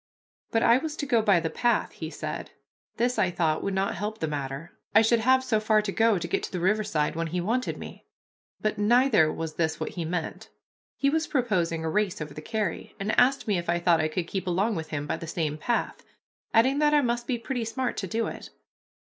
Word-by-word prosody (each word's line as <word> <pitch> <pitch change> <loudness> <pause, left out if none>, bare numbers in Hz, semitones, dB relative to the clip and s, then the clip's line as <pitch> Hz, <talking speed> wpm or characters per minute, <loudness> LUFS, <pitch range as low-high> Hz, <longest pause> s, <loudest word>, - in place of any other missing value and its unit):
But 225 - +1
I 235 +2 +5
was 310 +1 -4
to 290 - -3
go 235 -5 +3
by 200 -5 +4
the 160 -1 -3
path, 240 -1 +1
he - - -6
said. - - -5 0.5
This 245 +1 +1
I 185 - +3
thought 160 -3 0
would 195 - -1
not 195 +1 0
help 210 +3 -4
the 160 - -2
matter, 145 +2 -5 0.2
I 220 - +8
should 230 +1 +3
have 260 +3 +4
so 220 -4 +1
far 215 0 +3
to 205 - -2
go 225 0 +3
to 175 - -3
get - - 0
to - - -6
the 180 - -3
riverside 190 -5 +1
when 165 0 -1
he 175 +3 -2
wanted 235 +8 -1
me. - - -10 0.5
But 215 -1 -1
neither 220 - +4
was 160 -1 -5
this 160 -2 0
what - - -3
he 175 - -4
meant. 165 0 -4 0.5
He 275 0 +2
was 320 +1 0
proposing 180 - 0
a - - 0
race 210 -2 0
over 150 -2 -6
the 155 - -8
carry, 215 -1 -3
and 200 +2 -1
asked 265 +1 +3
me 200 -4 +2
if 170 - -6
I 170 - +2
thought 170 -2 +3
I 155 - +1
could 165 +2 -2
keep 185 +1 -4
along 195 +6 +1
with 160 -5 -4
him 145 -1 -3
by - - -2
the 165 - -8
same 155 -3 -2
path, 240 +9 -1 0.5
adding 260 +5 +4
that 300 0 +4
I 295 - +5
must 240 -2 -1
be 250 - 0
pretty 235 +1 -3
smart 245 +3 -2
to 190 - -3
do 225 +5 -1
it. - - -7
205 Hz, 235 wpm, -27 LUFS, 165-235 Hz, 0.5 s, I